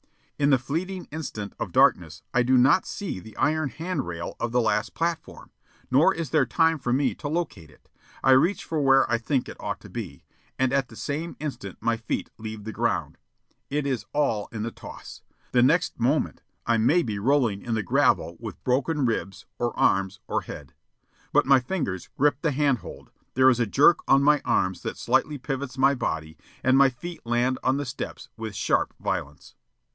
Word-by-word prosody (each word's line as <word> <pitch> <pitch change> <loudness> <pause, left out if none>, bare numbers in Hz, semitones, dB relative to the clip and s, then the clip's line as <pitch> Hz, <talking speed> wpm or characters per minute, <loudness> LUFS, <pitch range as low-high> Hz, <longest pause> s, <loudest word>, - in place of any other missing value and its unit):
In 140 0 +3
the 135 - +6
fleeting 175 +9 -4
instant 120 -10 -5
of - - -3
darkness 80 -3 +3
I 125 - +4
do 130 +2 +3
not 135 +9 +4
see 200 - -4
the 110 +4 -13
iron 155 +1 +1
hand 160 0 -4
rail 85 -1 -5
of 120 - -2
the 125 - +2
last 120 - 0
platform; 165 0 -3 0.4
nor 135 +5 +5
is 165 -2 -4
there 150 -5 +3
time 160 -1 +2
for 120 -2 -2
me 135 +3 +2
to 145 - -7
locate 150 - -3
it. - - -23 0.4
I 135 - +5
reach 165 +10 +4
for 160 -2 -1
where 135 -1 +5
I 115 - +2
think 130 +2 -1
it - - -9
ought - - -4
to - - -12
be, - - -7 0.3
and 130 0 +1
at 135 -2 +1
the 115 - -14
same 155 +8 -4
instant 135 -11 -6
my 115 +1 0
feet 115 - -4
leave 110 -1 -7
the 110 - -5
ground. - - -2 0.5
It 145 0 -1
is 125 -7 -2
all 125 -9 0
in 110 -2 -4
the 115 - -3
toss. - - -11 0.3
The 125 - +4
next 160 +6 +2
moment 135 +6 0 0.2
I 115 - +2
may 150 +11 +3
be 105 -4 -3
rolling 120 -4 +2
in 115 -2 -2
the 110 - -1
gravel 90 - +2
with - - -8
broken 140 +3 +1
ribs, 105 -4 -2
or 120 -1 -2
arms, 95 +1 +2
or - - 0
head. 70 -2 -10 0.6
But - - +4
my 135 -1 +6
fingers 125 - -3
grip 145 0 +2
the 160 - +1
hand 140 -3 +2
hold, - - -11 0.2
there 130 +1 +6
is 120 - 0
a 120 - +1
jerk 145 +9 +5
on 135 +1 +5
my 150 0 +4
arms 95 0 0
that - - -5
slightly 150 -1 +1
pivots 135 0 -5
my 135 +1 +4
body, 80 - -4 0.2
and 130 0 +4
my 135 0 +6
feet 165 +7 -9
land 120 +2 0
on 130 +1 +2
the 145 - -2
steps 120 - -6
with 110 -2 -6
sharp - - 0
violence. 75 +1 -4
130 Hz, 200 wpm, -25 LUFS, 115-145 Hz, 0.6 s, the